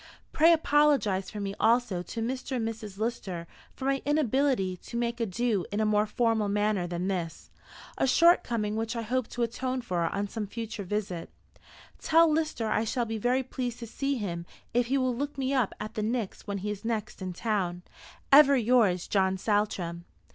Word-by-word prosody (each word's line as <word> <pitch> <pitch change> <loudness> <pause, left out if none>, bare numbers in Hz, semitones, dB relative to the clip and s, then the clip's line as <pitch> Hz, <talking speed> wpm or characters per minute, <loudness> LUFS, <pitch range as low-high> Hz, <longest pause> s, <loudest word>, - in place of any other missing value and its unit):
Pray 325 +2 +6
apologise 290 - +3
for 210 - -7
me 200 -1 -3
also 225 -5 +2
to 225 +5 -6
Mr. 260 +2 -3
and 225 -3 -1
Mrs. 215 -3 -6
Lister 200 -6 -3 0.3
for 265 - -6
my 275 0 +1
inability 270 -8 +1
to 235 - -7
make 235 0 -1
my 230 - 0
adieux 210 0 0
in 205 - -1
a 220 - +2
more 210 0 +2
formal 220 -1 +1
manner 205 -3 +1
than 175 +1 -3
this, 175 -4 -4 0.5
a - - +3
shortcoming 240 -9 +3
which 225 +2 -2
I 230 - -2
hope 250 +2 -1
to 240 - -2
atone 255 +2 -2
for 180 -7 -1
on 200 0 -2
some 210 0 -4
future 225 0 -5
visit. 190 -3 -3 0.7
Tell 330 +1 +5
Lister 310 -7 0
I 215 0 +1
shall 240 +2 -1
be 225 -1 -4
very 250 +4 +1
pleased 250 -2 -4
to 235 - -7
see 275 +4 -2
him 170 -6 -4 0.3
if 240 0 +2
he 270 +3 +1
will 255 -2 +1
look 285 +3 -4
me 270 0 -1
up 255 -6 +2
at 215 - -6
the 215 - -3
Pnyx 220 -2 -3
when 200 -1 -2
he 205 +2 -3
is 205 0 -6
next 220 -3 -3
in 185 -1 -3
town. 180 -3 -2 0.5
"Ever 280 0 +8
yours, 225 -7 +3
JOHN 190 -1 +2
SALTRAM." 185 -5 -1
225 Hz, 190 wpm, -28 LUFS, 200-255 Hz, 0.7 s, Ever